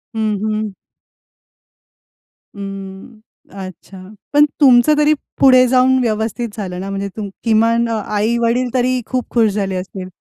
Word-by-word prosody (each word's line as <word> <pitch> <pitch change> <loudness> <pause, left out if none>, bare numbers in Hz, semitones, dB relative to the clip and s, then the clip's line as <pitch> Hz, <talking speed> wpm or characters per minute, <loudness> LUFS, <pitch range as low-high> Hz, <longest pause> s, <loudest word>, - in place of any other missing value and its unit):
हं, 215 -2 0
हं. 215 -1 -2 1.8
अं, 195 +2 -9 0.5
अच्छा. 185 +1 -12 0.4
पण 295 +1 +6 0.2
तुमचं 270 +3 +5
तरी 300 0 +4 0.3
पुढे 255 -2 +6
जाऊन 255 +1 +3
व्यवस्थित 225 0 -2
झालं 180 -3 -5
ना, 195 +1 -5
म्हणजे 195 0 -3
तुम 205 -2 -4
किमान 230 +1 +2
अ, - - -1 0.2
आई-वडील 235 +3 +1
तरी 255 0 +1
खूप 255 0 -3
खुश 225 -2 +4
झाले 195 -2 -2
असतील. 185 0 -6
220 Hz, 130 wpm, -17 LUFS, 200-250 Hz, 1.8 s, पण